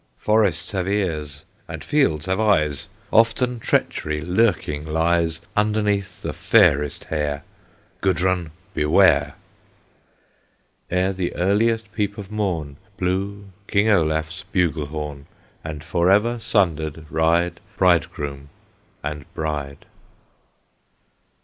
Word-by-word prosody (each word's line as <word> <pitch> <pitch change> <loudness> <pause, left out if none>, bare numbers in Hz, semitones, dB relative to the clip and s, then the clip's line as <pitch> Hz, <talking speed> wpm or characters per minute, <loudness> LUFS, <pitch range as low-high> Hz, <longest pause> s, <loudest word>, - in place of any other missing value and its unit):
"Forests 100 -6 +1
have 95 -3 -2
ears, 80 -8 -2 0.2
and - - -7
fields 85 - +1
have 95 +2 0
eyes; 75 -10 +2 0.3
Often 115 +2 +3
treachery 75 -7 0
lurking 90 -4 +1
lies 80 +1 +1
Underneath 105 -2 0
the - - -3
fairest 75 0 +3
hair! 75 -2 -2 0.6
Gudrun 95 -2 +1 0.2
beware!" 75 -2 +4 1.5
Ere 90 +2 +1
the 90 -2 -3
earliest 110 +4 +1
peep 100 -2 -2
of 100 -1 -8
morn 85 -10 -2 0.2
Blew 100 +2 -2 0.2
King 100 +2 +2
Olaf's 80 -3 +1
bugle 85 -6 0
horn; 75 -2 -6 0.4
And 75 -2 -6
forever 100 +8 +2
sundered 80 -8 0
ride 85 +2 +2 0.2
Bridegroom 75 -6 +1 0.5
and 75 -1 -6
bride! 75 -3 -4
85 Hz, 100 wpm, -22 LUFS, 75-100 Hz, 1.5 s, beware